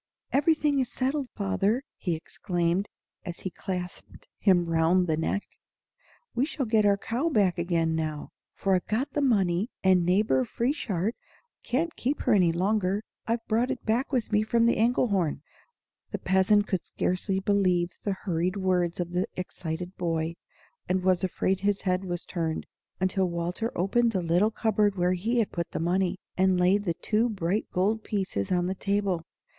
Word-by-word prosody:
"Everything 295 Hz, 0 st, +3 dB
is 255 Hz, -, -1 dB
settled, 270 Hz, 0 st, -1 dB
father!" 205 Hz, +4 st, 0 dB
he 175 Hz, -4 st, -2 dB
exclaimed, 175 Hz, +3 st, -1 dB, 0.3 s
as 175 Hz, -2 st, -7 dB
he 185 Hz, -, -4 dB
clasped 180 Hz, -1 st, -6 dB
him 185 Hz, -4 st, +4 dB
round 165 Hz, +2 st, +3 dB
the 160 Hz, -3 st, +1 dB
neck. 165 Hz, +5 st, -1 dB, 0.9 s
"We 240 Hz, -, +1 dB
shall 285 Hz, -2 st, -2 dB
get 215 Hz, -2 st, +3 dB
our 200 Hz, 0 st, +4 dB
cow 245 Hz, +10 st, -1 dB
back 195 Hz, -, +2 dB
again 170 Hz, -2 st, +1 dB
now; 155 Hz, -2 st, -3 dB, 0.3 s
for 195 Hz, -, +1 dB
I've 180 Hz, -, +1 dB
got 235 Hz, +6 st, -1 dB
the 295 Hz, -, 0 dB
money, 200 Hz, -5 st, +2 dB
and 185 Hz, -2 st, +5 dB
Neighbor 180 Hz, -7 st, +3 dB
Frieshardt 225 Hz, -, -1 dB, 0.5 s
can't 315 Hz, +8 st, -1 dB
keep 275 Hz, +4 st, -1 dB
her -, -, +3 dB
any 180 Hz, -5 st, +4 dB
longer. 195 Hz, +3 st, 0 dB, 0.2 s
I've 230 Hz, 0 st, -1 dB
brought 235 Hz, +3 st, +1 dB
it 265 Hz, -3 st, -4 dB
back 235 Hz, +6 st, 0 dB
with 245 Hz, -5 st, -1 dB
me 210 Hz, 0 st, +4 dB
from 230 Hz, +2 st, +2 dB
the 235 Hz, -, +3 dB
Engelhorn." 200 Hz, -, +1 dB, 0.7 s
The -, -, -3 dB
peasant 190 Hz, +2 st, +3 dB
could 185 Hz, -4 st, -2 dB
scarce 180 Hz, +3 st, -2 dB
believe 190 Hz, -3 st, +2 dB
the 200 Hz, -, 0 dB
hurried 180 Hz, +1 st, 0 dB
words 180 Hz, -3 st, 0 dB
of 175 Hz, -1 st, -2 dB
the 180 Hz, +1 st, 0 dB
excited 180 Hz, 0 st, -5 dB
boy, 165 Hz, -2 st, -1 dB, 0.6 s
and 185 Hz, 0 st, +1 dB
was 185 Hz, 0 st, +2 dB
afraid 190 Hz, +1 st, 0 dB
his 200 Hz, 0 st, 0 dB
head 185 Hz, 0 st, 0 dB
was 175 Hz, -1 st, -4 dB
turned, 165 Hz, -3 st, -2 dB, 0.3 s
until 185 Hz, 0 st, +1 dB
Walter 175 Hz, +7 st, -2 dB
opened 230 Hz, +6 st, +2 dB
the 185 Hz, -3 st, 0 dB
little 175 Hz, +6 st, +3 dB
cupboard 215 Hz, -2 st, +1 dB
where 180 Hz, 0 st, +2 dB
he 220 Hz, +7 st, -1 dB
had 225 Hz, -3 st, +1 dB
put 170 Hz, -1 st, -3 dB
the -, -, -4 dB
money, 180 Hz, +2 st, +1 dB, 0.2 s
and 190 Hz, -1 st, +3 dB
laid 195 Hz, +3 st, +3 dB
the 170 Hz, -3 st, 0 dB
two 220 Hz, +6 st, +1 dB
bright 195 Hz, 0 st, -1 dB
gold 210 Hz, +5 st, +1 dB
pieces 190 Hz, -, -2 dB
on 175 Hz, -1 st, +2 dB
the 185 Hz, -, -1 dB
table. 200 Hz, -3 st, 0 dB
190 Hz, 170 wpm, -27 LUFS, 175-220 Hz, 0.9 s, and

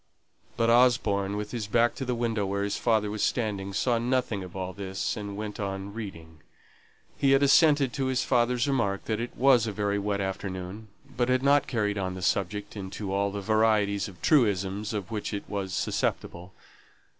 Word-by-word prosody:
But 115 Hz, 0 st, +3 dB
Osborne, 110 Hz, -5 st, +3 dB
with 105 Hz, 0 st, -5 dB
his 115 Hz, -4 st, -4 dB
back 120 Hz, +2 st, +3 dB
to 135 Hz, -, -5 dB
the 125 Hz, -1 st, -1 dB
window 115 Hz, -3 st, -1 dB
where 100 Hz, +1 st, -1 dB
his 100 Hz, -, -1 dB
father 110 Hz, -3 st, +1 dB
was 105 Hz, -1 st, -4 dB
standing, 100 Hz, -5 st, -1 dB
saw 115 Hz, +4 st, +1 dB
nothing 120 Hz, -4 st, 0 dB
of 90 Hz, 0 st, -10 dB
all 95 Hz, -1 st, -4 dB
this, 95 Hz, 0 st, -3 dB
and 100 Hz, -2 st, -6 dB
went 105 Hz, -1 st, -5 dB
on 100 Hz, 0 st, -4 dB
reading. 85 Hz, -8 st, -8 dB, 0.8 s
He 135 Hz, -1 st, +4 dB
had 135 Hz, +1 st, +4 dB
assented 140 Hz, -2 st, +5 dB
to 135 Hz, -1 st, -1 dB
his 130 Hz, 0 st, 0 dB
father's 125 Hz, 0 st, +2 dB
remark 105 Hz, -8 st, 0 dB
that 110 Hz, -1 st, -1 dB
it 120 Hz, +1 st, -5 dB
was 125 Hz, -4 st, +4 dB
a -, -, -1 dB
very 100 Hz, 0 st, -1 dB
wet 100 Hz, 0 st, -1 dB
afternoon, 95 Hz, +1 st, -5 dB, 0.3 s
but 125 Hz, 0 st, 0 dB
had 130 Hz, +1 st, +2 dB
not 140 Hz, 0 st, +4 dB
carried 105 Hz, -4 st, -1 dB
on 95 Hz, -1 st, -2 dB
the 95 Hz, -, -7 dB
subject 100 Hz, +3 st, -1 dB
into 95 Hz, 0 st, -5 dB
all 100 Hz, 0 st, +1 dB
the 100 Hz, 0 st, -4 dB
varieties 110 Hz, -1 st, +2 dB
of 95 Hz, -4 st, -13 dB
truisms 105 Hz, -, +2 dB
of 105 Hz, -3 st, -4 dB
which 105 Hz, -1 st, -3 dB
it 100 Hz, -, -6 dB
was 100 Hz, -2 st, -4 dB
susceptible. 90 Hz, 0 st, -2 dB
105 Hz, 190 wpm, -27 LUFS, 100-120 Hz, 0.8 s, assented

